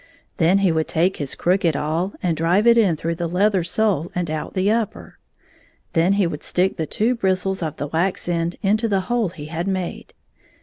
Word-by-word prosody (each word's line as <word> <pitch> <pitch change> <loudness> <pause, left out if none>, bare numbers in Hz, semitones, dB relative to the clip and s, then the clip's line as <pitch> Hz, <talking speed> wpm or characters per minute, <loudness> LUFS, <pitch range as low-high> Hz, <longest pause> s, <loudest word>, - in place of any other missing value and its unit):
Then 175 +3 +4
he 195 -3 +3
would 160 -1 0
take 175 +4 +1
his 145 -3 -4
crooked 180 -3 +1
awl 165 +6 -1
and 175 -3 +1
drive 175 +7 +2
it 235 0 +7
in 205 -8 +3
through 165 +2 -2
the 170 0 -3
leather 190 +1 +2
sole 175 -2 0
and 175 -3 -2
out 155 +5 -4
the 190 +2 +2
upper. 225 -1 -3 0.7
Then 170 +4 +3
he 200 -1 +2
would 155 -3 -4
stick 185 +2 0
the 160 - -3
two 230 +4 +1
bris 190 -6 0
tles 190 -1 -2
of 155 -3 -3
the - - -3
wax 170 +6 -1
end 170 0 -1
into 215 +3 +2
the 195 -3 +1
hole 225 +1 0
he 160 -4 -9
had 170 +4 -4
made. 185 -2 -4
180 Hz, 210 wpm, -21 LUFS, 165-195 Hz, 0.7 s, it